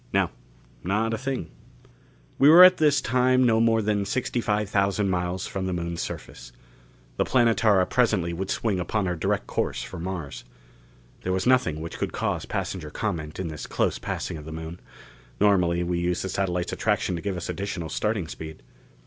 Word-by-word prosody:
"No. -, -, +2 dB, 0.5 s
Not 105 Hz, +5 st, 0 dB
a -, -, -1 dB
thing." 130 Hz, -10 st, -4 dB, 0.9 s
We 140 Hz, -, +7 dB
were 170 Hz, +3 st, +10 dB
at 185 Hz, 0 st, +8 dB
this 150 Hz, -2 st, +3 dB
time 130 Hz, 0 st, +3 dB
no 115 Hz, -2 st, +4 dB
more 115 Hz, -1 st, +3 dB
than 105 Hz, -1 st, +1 dB
sixty 125 Hz, +3 st, -1 dB
five 105 Hz, -1 st, 0 dB
thousand 100 Hz, 0 st, +1 dB
miles 90 Hz, +1 st, -2 dB
from 95 Hz, -1 st, -3 dB
the 95 Hz, -, -2 dB
Moon's 85 Hz, -1 st, -3 dB
surface. -, -, -7 dB, 0.7 s
The -, -, +3 dB
Planetara 115 Hz, -6 st, +3 dB
presently 95 Hz, -9 st, +1 dB
would 95 Hz, +3 st, -4 dB
swing 105 Hz, -5 st, 0 dB
upon 100 Hz, +3 st, -1 dB
her 90 Hz, -1 st, -1 dB
direct 80 Hz, -, -1 dB
course -, -, -2 dB
for 95 Hz, -, -8 dB
Mars. 85 Hz, -5 st, -5 dB, 0.8 s
There 90 Hz, -, -2 dB
was 95 Hz, 0 st, -1 dB
nothing 125 Hz, -12 st, +2 dB
which 80 Hz, -, -7 dB
could -, -, -2 dB
cause -, -, -2 dB
passenger 80 Hz, -5 st, -3 dB
comment 80 Hz, -4 st, -4 dB
in 90 Hz, -3 st, -3 dB
this 75 Hz, -2 st, -7 dB
close -, -, 0 dB
passing -, -, -4 dB
of 75 Hz, -, -10 dB
the 80 Hz, -, -7 dB
Moon; 80 Hz, +2 st, -7 dB, 0.6 s
normally 90 Hz, -4 st, +3 dB
we 85 Hz, 0 st, -1 dB
used 90 Hz, 0 st, -1 dB
the 95 Hz, -, -3 dB
satellite's 90 Hz, -2 st, -1 dB
attraction 90 Hz, -, 0 dB
to 85 Hz, -, -5 dB
give 95 Hz, -1 st, -3 dB
us 85 Hz, -, -5 dB
additional 95 Hz, -4 st, -4 dB
starting 105 Hz, -2 st, -1 dB
speed. 80 Hz, -3 st, -9 dB
95 Hz, 185 wpm, -25 LUFS, 85-110 Hz, 0.9 s, were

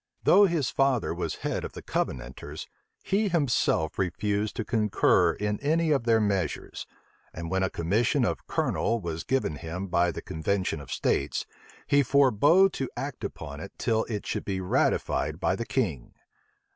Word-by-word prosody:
Though 205 Hz, -, +7 dB
his 165 Hz, -7 st, 0 dB
father 135 Hz, -4 st, +1 dB
was -, -, -3 dB
head -, -, -1 dB
of -, -, -6 dB
the -, -, -9 dB
Covenanters, 65 Hz, 0 st, -4 dB, 0.4 s
he 205 Hz, +2 st, +1 dB
himself 135 Hz, -, +1 dB
refused 100 Hz, +3 st, -1 dB
to 115 Hz, -, -3 dB
concur 105 Hz, -3 st, +3 dB
in 105 Hz, 0 st, -2 dB
any 160 Hz, +2 st, +1 dB
of 135 Hz, -5 st, +1 dB
their 115 Hz, -1 st, +4 dB
measures; 100 Hz, -5 st, -2 dB, 0.5 s
and 85 Hz, 0 st, -5 dB
when 95 Hz, 0 st, +1 dB
a 95 Hz, -, +1 dB
commission 115 Hz, -, +1 dB
of 85 Hz, -6 st, -3 dB
colonel 115 Hz, 0 st, 0 dB
was 85 Hz, -4 st, -4 dB
given 130 Hz, -, -1 dB
him 85 Hz, +5 st, -5 dB
by 90 Hz, 0 st, +3 dB
the -, -, -7 dB
convention 80 Hz, 0 st, -2 dB
of 65 Hz, -, -11 dB
states, -, -, 0 dB, 0.4 s
he 145 Hz, -, +4 dB
forbore 140 Hz, -, +4 dB
to 135 Hz, -, -3 dB
act -, -, -5 dB
upon -, -, -6 dB
it -, -, -8 dB
till 110 Hz, 0 st, +1 dB
it 105 Hz, -3 st, -4 dB
should -, -, -3 dB
be 95 Hz, -2 st, -2 dB
ratified 90 Hz, -1 st, 0 dB
by -, -, +1 dB
the 115 Hz, -, -5 dB
king. 90 Hz, -, -2 dB
105 Hz, 165 wpm, -27 LUFS, 90-135 Hz, 0.5 s, Though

